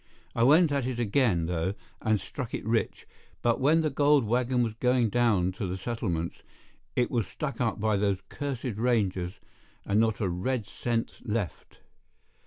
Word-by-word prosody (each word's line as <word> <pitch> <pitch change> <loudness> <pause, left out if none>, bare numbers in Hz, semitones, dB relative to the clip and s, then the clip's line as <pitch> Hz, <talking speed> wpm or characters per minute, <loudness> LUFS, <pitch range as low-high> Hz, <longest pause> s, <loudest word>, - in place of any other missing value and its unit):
I - - -1
went 150 +6 +6
at 140 -3 0
it 130 -2 -3
again, 110 -6 +2
though, 90 +3 -1 0.3
and 110 -2 +2
struck - - -5
it - - -6
rich; - - -1 0.4
but 120 -1 +2
when 155 +5 +4
the 155 -2 0
gold 145 -2 +4
wagon 125 +2 +1
was 115 -2 -2
going 125 0 +2
down 105 -6 +2
to 100 - -1
the 90 +1 -3
settlements, 95 -6 -3 0.6
it 125 - +1
was 115 -6 0
stuck 145 -3 -4
up 115 -2 0
by 110 0 +2
those 100 -1 +1
cursed 130 -5 -4
rangers, 100 -7 +1 0.5
and 100 +2 +2
not 110 -1 +2
a 100 - 0
red 100 +7 -1
cent 115 +2 -2
left." 105 -6 -4
115 Hz, 170 wpm, -28 LUFS, 100-125 Hz, 0.6 s, went